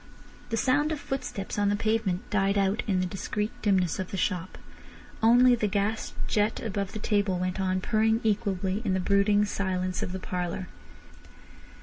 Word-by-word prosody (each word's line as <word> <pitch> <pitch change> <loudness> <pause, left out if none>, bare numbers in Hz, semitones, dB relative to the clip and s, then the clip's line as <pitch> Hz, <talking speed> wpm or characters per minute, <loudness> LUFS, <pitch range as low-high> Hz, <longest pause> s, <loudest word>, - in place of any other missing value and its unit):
The 225 - -1
sound 290 +6 +2
of 310 - -2
footsteps 210 -8 -4
on 205 0 +3
the 205 - +2
pavement 215 -4 0
died 195 0 +2
out 200 +3 +2
in 190 -3 +1
the - - 0
discreet 210 +3 -3
dimness 190 -6 +1
of 190 - -3
the 195 - -4
shop. 185 -1 -2 0.6
Only 245 +2 +6
the 225 -3 +1
gas 205 +2 -1
jet 210 +1 +1
above 200 -3 -3
the - - -4
table 205 -3 +1
went 185 +1 -2
on 185 0 0
purring 220 +2 +2
equably 200 -2 0
in 195 -4 +1
the - - +1
brooding 200 +2 +3
silence 185 -2 -2
of - - -3
the 190 - -4
parlour. 180 0 -4
200 Hz, 175 wpm, -27 LUFS, 185-215 Hz, 0.6 s, Only